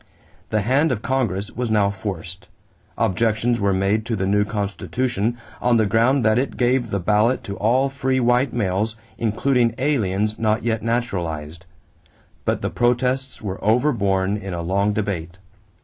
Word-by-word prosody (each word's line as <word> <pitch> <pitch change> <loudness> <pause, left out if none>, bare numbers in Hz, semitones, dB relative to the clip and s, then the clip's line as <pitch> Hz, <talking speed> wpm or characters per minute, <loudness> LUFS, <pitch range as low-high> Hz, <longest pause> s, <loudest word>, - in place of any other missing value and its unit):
The 110 - +1
hand 135 +9 +2
of 115 -3 -2
Congress 115 -6 -1
was 125 -2 -3
now 105 -2 +3
forced. 95 -2 -6 0.5
Objections 115 +3 +1
were 100 -1 +2
made 100 +3 +1
to 115 - 0
the 95 -2 -1
new 105 +1 +3
constitution 110 +2 -2 0.2
on 120 -1 +3
the 110 - +3
ground 115 +5 +2
that 110 +2 +4
it 135 - -3
gave 125 -1 +1
the 100 - -1
ballot 105 +7 +2
to 100 - -5
all 125 +5 +2
free 130 -1 -1
white 125 +1 +2
males, 105 0 -1 0.2
including 115 +1 +1
aliens 110 -7 0
not 110 0 +1
yet 115 -1 0
naturalized; 85 -9 -3 0.8
but - - 0
the - - -1
protests 125 +2 0
were 95 -2 -5
overborne 105 -5 +2
in 95 -3 -5
a 85 - -4
long 100 +4 +1
debate. 95 -5 -3
110 Hz, 155 wpm, -22 LUFS, 100-120 Hz, 0.8 s, that